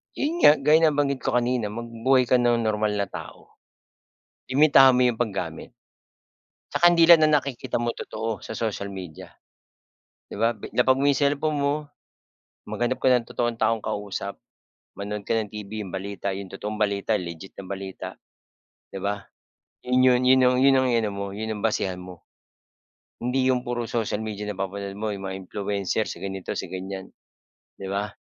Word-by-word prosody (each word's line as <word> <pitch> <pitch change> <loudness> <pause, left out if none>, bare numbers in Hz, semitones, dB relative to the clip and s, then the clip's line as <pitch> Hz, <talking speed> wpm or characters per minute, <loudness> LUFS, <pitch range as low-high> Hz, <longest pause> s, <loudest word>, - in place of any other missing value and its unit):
'Yun 320 +5 -1
nga, 145 - +9
gaya 150 +2 +4
nabanggit 145 -4 +2
ko 130 -1 -1
kanina 125 -2 +1
magbuhay 115 +4 +1
ka 125 +1 +3
ng 120 -1 +2
normal 105 -1 0
na 100 - +1
tao. - - -10 0.9
Limitahan 135 -1 +7
mo 125 0 +4
'yung 120 - 0
paggamit. 95 -8 -4 1.0
'Tsaka 175 0 +5
'di 170 - +5
lahat 165 - +9
ng 155 - +4
nakikita 140 -4 -2
mo 120 0 0
totoo, 115 -1 -5
sa 110 - -7
social 105 -3 -3
media. 95 -5 -9 0.9
'Di - - -9
ba? 115 +3 +2 0.2
Lapag 130 +2 +4
mo 140 - +2
'yong 140 - +4
cellphone 145 +2 +1
mo, 140 0 +1 0.9
maghanap 110 +3 -1
ka - - -1
ng 125 -2 +4
totoong 120 -1 -1
taong 115 0 +1
kausap, 100 -1 -4 0.6
manood 100 0 -5
ka - - +1
ng 110 -2 -1
TV 105 0 -6
'yong 95 - -8
balita, 100 +1 -4
'yong 95 0 -6
totoong 105 +2 -5
balita, 105 +1 +1
legit 85 +1 -7
na 100 - -7
balita, 95 0 -6 0.7
'di - - -10
ba? 100 +1 -3 0.5
'Yun 125 0 +1
'yon 125 -1 +5
'yun 130 +1 +5
'yon 125 - +4
'yun 135 0 +6
'yong 130 -1 +2
iano 110 -3 +1
mo, 100 0 -4
'yon 110 +2 -4
ang - - -8
basehan 95 -4 -1
mo. 90 -1 -10 1.0
Hindi 130 +1 +1
'yong 125 -1 +1
puro 120 -1 -3
social 110 -3 -1
media 105 -1 -5
napapanood 100 -1 -4
mo, 110 - -2
'yung 100 -1 -6
mga 95 0 -4
influencer 100 +2 -2
si 95 - -7
ganito, 95 0 -5
si - - -4
ganyan, 95 +1 -6 0.7
'di 95 - -5
ba? 100 +2 -2
110 Hz, 170 wpm, -25 LUFS, 100-125 Hz, 1.0 s, nga